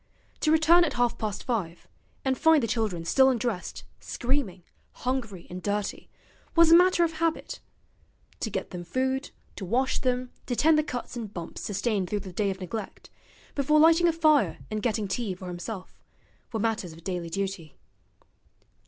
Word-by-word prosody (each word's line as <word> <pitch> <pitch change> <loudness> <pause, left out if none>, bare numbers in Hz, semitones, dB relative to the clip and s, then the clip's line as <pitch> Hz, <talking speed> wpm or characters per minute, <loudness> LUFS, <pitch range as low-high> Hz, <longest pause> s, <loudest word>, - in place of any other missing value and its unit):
To 310 - +2
return 320 +2 +6
at 335 - 0
half 240 -1 +1
past 210 -3 -3
five, 190 -9 -3 0.4
and 265 0 +2
find 320 -1 +4
the - - +1
children 210 -7 -1
still 265 +9 +5
undressed, 235 -7 -2 0.2
screaming, 240 -9 -2 0.3
hungry 235 -8 -3
and 180 +1 -7
dirty, 205 0 -3 0.5
was 335 -1 +6
a - - +10
matter 360 0 +5
of 330 - +1
habit: 330 -1 -1 0.8
to 220 - -2
get 190 -2 -4
them 180 -1 -6
food, 260 +8 -1 0.3
to - - -5
wash 250 +8 +1
them, 250 -1 -1 0.2
to 245 - -1
tend 305 +4 +4
the - - +2
cuts 250 -5 -5
and 225 -4 -5
bumps 170 -5 -7
sustained 200 -2 -1
through 205 -1 -1
the 185 - -9
day 205 +2 0
of 190 0 -4
neglect, 195 +3 -6 0.4
before 300 +2 +3
lighting 330 +2 +6
a - - +5
fire 305 - +3
and 215 0 -2
getting 215 -2 0
tea 195 -1 -2
for 185 0 -8
himself, 180 +3 -7 0.5
were 225 - -2
matters 215 -6 -1
of 165 +1 -14
daily 175 -2 -3
duty. 190 -4 -4
225 Hz, 170 wpm, -27 LUFS, 190-270 Hz, 0.8 s, a